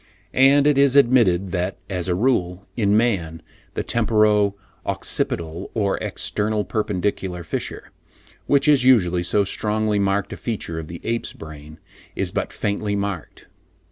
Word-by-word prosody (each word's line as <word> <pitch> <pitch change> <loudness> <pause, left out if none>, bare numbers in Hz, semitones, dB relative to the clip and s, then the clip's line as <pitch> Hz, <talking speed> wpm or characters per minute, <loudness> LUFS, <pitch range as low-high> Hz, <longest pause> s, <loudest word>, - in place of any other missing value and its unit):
And 140 +2 +5
it 145 -2 +4
is 140 -1 +4
admitted 115 -9 +4
that, 90 +1 -2
as 90 -3 -3
a 90 - +1
rule, 95 -5 0
in 105 -2 +2
man, 85 -9 0 0.3
the - - -1
temporo 105 -3 +2 0.3
occipital 85 +2 -2
or 100 -3 0
"external 105 0 -2
perpendicular" 95 -4 -2
fissure, 80 - -4 0.6
which 140 0 +3
is 145 -4 +5
usually 95 -9 +4
so 100 +4 +1
strongly 105 +1 0
marked 100 0 0
a - - -7
feature 100 -8 -4
of 80 - -7
the 85 +1 -9
ape's 115 0 -2
brain 75 -1 -11 0.4
is - - -1
but - - -2
faintly 100 0 -2
marked. 100 -5 -5
100 Hz, 140 wpm, -22 LUFS, 90-115 Hz, 0.6 s, And